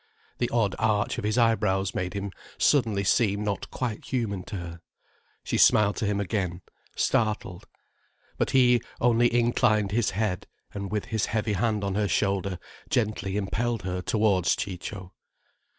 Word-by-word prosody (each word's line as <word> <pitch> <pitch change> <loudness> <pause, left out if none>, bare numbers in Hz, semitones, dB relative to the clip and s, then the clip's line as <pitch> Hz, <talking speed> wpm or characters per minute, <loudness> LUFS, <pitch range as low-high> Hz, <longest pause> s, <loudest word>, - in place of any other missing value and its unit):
The 120 - 0
odd 110 -4 +1
arch 110 -1 +1
of - - -5
his 105 +2 0
eyebrows 105 -5 +2
made 90 +1 -3
him 100 0 -3 0.3
suddenly 110 -9 +2
seem 100 +1 +2
not 100 -1 -3
quite 120 -4 -4
human 110 -7 -2
to 105 - -7
her. 85 -2 -7 0.6
She - - -1
smiled 105 -1 +5
to 110 - -1
him 100 0 0
again, 95 -3 -2 0.3
startled. 105 -5 -1 0.7
But - - +1
he 125 -3 +4 0.2
only 120 0 +3
inclined 115 -3 +2
his 115 +1 +1
head, 105 -4 -1 0.3
and 100 -1 -5
with 105 -1 -1
his 110 -2 -1
heavy 110 -1 -1
hand 105 0 0
on 100 -1 -1
her 105 +1 +1
shoulder 95 0 0 0.3
gently 105 -4 -1
impelled 110 +2 -1
her 90 0 -3
towards 100 -3 +2
Ciccio. 95 -1 -6
105 Hz, 150 wpm, -26 LUFS, 95-115 Hz, 0.7 s, smiled